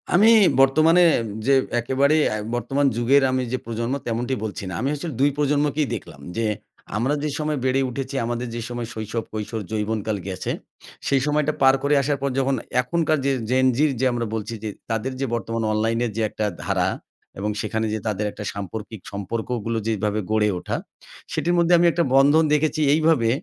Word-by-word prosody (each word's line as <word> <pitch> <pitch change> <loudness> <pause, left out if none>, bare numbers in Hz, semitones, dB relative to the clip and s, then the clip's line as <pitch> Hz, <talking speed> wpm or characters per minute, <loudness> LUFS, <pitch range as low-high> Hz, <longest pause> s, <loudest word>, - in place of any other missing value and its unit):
আমি 200 +6 +6 0.3
বর্তমানে 155 +6 +5 0.4
যে 140 - +4 0.3
একেবারে 135 +5 +2 0.2
এ - - -1 0.2
বর্তমান 135 +4 0
যুগের 130 +4 +4
আমি 130 0 0
যে 130 - 0
প্রজন্ম 115 +2 -2
তেমনটি 120 +3 -1
বলছি 105 -2 -4
না। - - -6
আমি 135 - 0
আসলে 155 +1 -5
২ 140 - +5
প্রজন্মকেই 145 0 +1
দেখলাম। 70 - -10 0.2
যে 115 - +1 0.5
আমরা 125 +6 +1
যে 150 - 0
সময় 150 -1 -1
বেড়ে 130 +1 +2
উঠেছি, 135 +2 -5
আমাদের 120 +1 -3
যে 120 - -3
সময় 120 -1 -4
শৈশব, 110 +1 -4
কৈশোর, 110 +1 -4
যৌবনকাল 110 0 -1
গেছে। 95 -1 -3 0.6
সেই 135 -1 +3
সময়টা 150 0 +1
পার 135 0 +7
করে 145 +1 +3
আসার 145 +1 0
পর 140 - 0
যখন 135 0 +1 0.3
এখনকার 155 +3 0
যে 140 - +3 0.2
Gen 130 +1 +3
Z - - -2
র - - 0
যে - - +3
আমরা 120 -1 -1
বলছি। 110 +1 -4
যে 110 - -2 0.2
তাদের 115 +3 -1
যে 135 - 0
বর্তমান 115 -1 -2
অনলাইনের 115 +2 0
যে - - 0
একটা 110 - -3 0.2
ধারা - - +1 0.5
এবং 105 +2 -1
সেখানে 110 +1 -1
যে 110 - -1
তাদের 105 0 -1
একটা 105 - -8
সাম্পর্কিক 105 +2 -6
সম্পর্কগুলো 115 +3 -3
যেভাবে 105 -1 0
গড়ে 110 -1 +3
ওঠা। - - -3 0.5
সেটির 160 +3 0
মধ্যে 170 0 +4
আমি 175 - +4
একটা 170 - +1
বন্ধন 145 +4 +6
দেখেছি 155 +1 +1
এইভাবে। 155 -7 +3
125 Hz, 180 wpm, -23 LUFS, 110-145 Hz, 0.6 s, পার